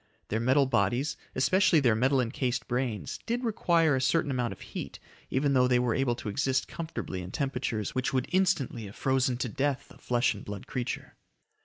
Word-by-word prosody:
Their 110 - 0
metal 130 +4 +4
bodies, 120 +4 +1 0.2
especially 170 +5 +4
their 125 -5 +4
metal 130 +5 +2
encased 125 +1 -2
brains, 120 -3 -2
did 240 +2 -1
require 170 - +2
a 130 - 0
certain 145 +1 +2
amount 125 -3 -1
of - - -9
heat - - -7 0.3
even 140 +1 +1
though 125 -1 +4
they 125 -1 +4
were 125 -2 +1
able 135 -3 +1
to 120 - -8
exist 130 +3 0
comfortably 160 - -5
in 90 - -7
temperatures 125 -5 -2
which 130 0 0
would 130 -2 0
instantly 180 - +1
have 100 - -11
frozen 130 -2 +1
to 125 - -2
death 135 +4 -2
a - - -16
flesh 120 0 +1
and 100 - -9
blood 100 -1 -7
creature. 125 -2 -4
130 Hz, 190 wpm, -29 LUFS, 120-140 Hz, 0.3 s, metal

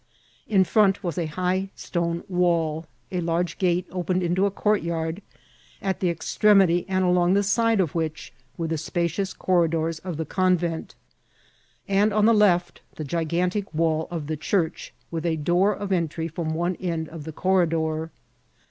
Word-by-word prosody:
In 195 -3 +4
front 200 +1 +3
was 175 -2 -2
a 165 - -1
high 185 +4 -1
stone 170 -1 -2
wall; 170 -4 0 0.2
a 180 - -1
large 170 +1 -1
gate 180 -1 +1
opened 185 0 -1
into 180 +3 +2
a - - +1
courtyard, 170 -4 -1 0.6
at 190 -1 -2
the 180 - +1
extremity 180 +1 +3
and 185 -1 +1
along 180 +1 +3
the 200 - +3
side 230 +2 +2
of 175 -6 +1
which 160 -2 -3 0.2
were 165 - -2
the 160 -1 -2
spacious 175 +4 -1
corridors 165 -3 +1
of 180 -4 -5
the 160 - -2
convent, 175 -1 0 0.9
and 200 +2 +3
on 210 0 +3
the 230 - +6
left 180 -5 +2
the 155 - -5
gigantic 175 +6 -1
wall 160 0 +1
of 165 -4 -4
the 155 +1 -3
church, 165 +1 -1 0.2
with 165 -1 -3
a 170 -2 +1
door 175 +6 +2
of 205 -1 -4
entry 165 -2 -1
from 160 -1 -3
one 175 +2 -1
end 165 -3 -3
of 160 -2 -9
the 160 - -6
corri* 185 +1 +2
dor. 160 0 -1
175 Hz, 165 wpm, -24 LUFS, 165-190 Hz, 0.9 s, the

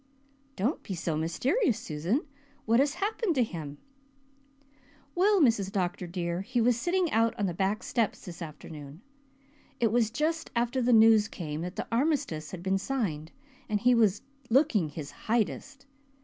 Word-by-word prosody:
"Don't 235 - -1
be 190 - -5
so 165 -1 -2
mysterious, 245 - +1
Susan. 180 - -2 0.4
What 230 +2 +4
has 280 +2 +2
happened 400 -1 -1
to 255 - +4
him?" 155 -8 -6 1.4
"Well, 395 +3 +4
Mrs. 225 - +3
Dr. 180 -2 -2
dear, 170 0 -3
he 240 +5 -2
was 235 +1 +4
sitting 350 +6 0
out 230 +1 +2
on 205 - 0
the 180 - -1
back 195 +6 -1
steps 230 -4 -1
this 175 -1 -9
afternoon. 150 -1 -9 0.8
It 230 -4 +2
was 230 -2 +2
just 310 +7 -1
after 240 +2 +1
the 245 +1 +2
news 220 -2 +6
came 155 -7 -5
that 180 +2 -5
the - - -3
Armistice 230 - 0
had 175 -2 -8
been 190 +1 +1
signed 185 - -2 0.4
and 210 -1 +1
he 245 +3 +4
was 220 -1 +3 0.3
looking 235 - +3
his 145 -1 -7 0.2
Hydest. 255 +5 -1
220 Hz, 160 wpm, -29 LUFS, 175-255 Hz, 1.4 s, news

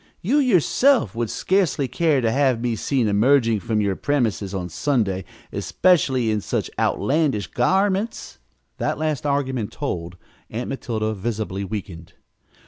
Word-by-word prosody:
You, 245 +11 +2
yourself, 255 - +3
would 115 -1 -2
scarcely 180 -8 +1
care 140 +2 +1
to 115 -2 +1
have 130 -2 +2
me 120 -1 -1
seen 125 0 0
emerging 115 +2 +3
from 105 +3 -1
your 100 -2 0
premises, 110 - -1
on 95 -3 -3
Sunday 95 - -1 0.3
especially, 130 -10 +2
in 105 -1 0
such - - -2
outlandish 140 - +1
garments." 195 - 0 0.4
That - - -1
last 155 -2 -1
argument 130 -6 -1
told. 85 +1 -4 0.3
Aunt 120 +3 -4
Matilda 110 -5 -2
visibly 105 -2 -3
weakened. 95 -4 -7
120 Hz, 135 wpm, -22 LUFS, 105-145 Hz, 0.4 s, yourself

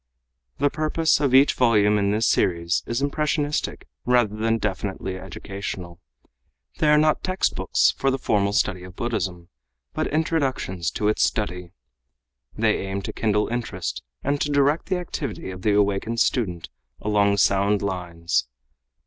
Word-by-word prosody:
The 145 0 +2
purpose 155 0 +1
of 140 -3 +1
each 135 +2 +6
volume 105 -4 +3
in 100 0 +1
this 110 +3 +1
series 85 -1 +1
is 120 +4 -1
impressionistic 150 0 -1 0.2
rather 120 -4 +2
than 115 +1 +1
definitely 95 -2 -3
educational. 95 -1 -7 0.8
They 155 - +2
are 150 - +6
not 155 0 +2
textbooks 185 0 +1
for 135 - +1
the 135 - 0
formal 100 -5 +1
study 95 -3 +1
of 90 0 -11
Buddhism, 95 -8 -3 0.4
but - - -1
introductions 140 - -1
to 105 - -1
its 105 - +1
study. 90 -5 -2 0.8
They - - +2
aim 95 0 -3
to - - -5
kindle 105 -1 +1
interest 120 0 -3 0.2
and 140 +1 0
to 150 - 0
direct 145 +2 +2
the 185 - 0
activity 140 - -5
of 90 0 -9
the 105 +2 +2
awakened 105 +3 +1
student 90 - 0 0.3
along 100 -1 +2
sound 100 +1 +2
lines. 85 -7 -1
105 Hz, 145 wpm, -24 LUFS, 95-135 Hz, 0.8 s, each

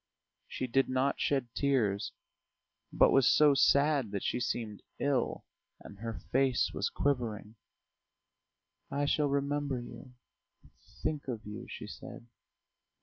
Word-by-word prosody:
She - - -3
did 135 +2 +1
not 130 +2 +1
shed 135 -4 0
tears, 115 -8 +1 0.8
but - - +5
was 135 -3 +5
so 150 -1 +6
sad 140 -2 +3
that 100 - -2
she - - -1
seemed 110 -4 -3 0.2
ill, 140 -4 0 0.3
and 100 - -13
her 115 -1 -5
face 130 -1 +2
was - - -1
quivering. 115 -6 -1 1.4
"I 140 +1 0
shall 145 +1 +2
remember 140 -1 -1
you... 125 +1 -11 0.9
think 150 -2 -2
of 115 -4 -5
you," 105 0 -7
she - - -7
said. 120 +2 -10
130 Hz, 125 wpm, -31 LUFS, 115-140 Hz, 1.4 s, so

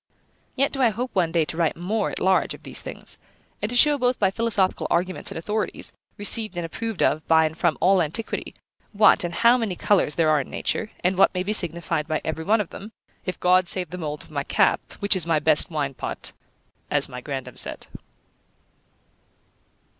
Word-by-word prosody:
Yet 275 +2 +2
do 270 - -3
I 245 - +5
hope 245 +4 -4
one 175 -4 +1
day 165 -2 +2
to 160 - -5
write 165 -2 +1
more 200 +5 -1
at - - -5
large 190 0 +2
of - - -18
these - - -5
things, - - -6 0.4
and 210 - -1
to 245 - -3
show 290 +3 +6
both 250 0 +1
by 195 -2 +2
philosophical 205 -3 +1
arguments 180 +1 -1
and - - -7
authorities, 210 +6 -3 0.2
received 205 -2 +2
and 175 - -2
approved 225 +4 -3
of 155 - +1
by 160 0 +5
and 155 0 -3
from 170 -1 +1
all 185 +1 +4
antiquity, 170 +8 -3 0.4
what, 210 -2 +5
and 175 - -2
how 235 +5 +4
many 215 -6 -2
colours 185 -6 +2
there 160 -2 +3
are 150 -2 +3
in - - -9
nature, 215 - -2
and 185 +1 +1
what - - +6
may 180 - 0
be 205 +3 -1
signified 170 -4 -1
by 155 -1 -1
every 160 0 -3
one 215 +5 +3
of 195 - -7
them, 210 +3 -9 0.4
if 185 - -3
God 180 0 +4
save 180 -2 -2
the 180 - -5
mould 150 -2 -5
of - - -19
my 140 -2 -2
cap, - - +2 0.2
which 200 0 +3
is 175 -3 -2
my 165 -2 +3
best 155 +3 +2
wine 145 -4 -2
pot, - - -4 0.6
as - - +3
my 125 0 -8
grandam 135 -1 -6
said. - - -2
180 Hz, 205 wpm, -24 LUFS, 160-210 Hz, 0.6 s, show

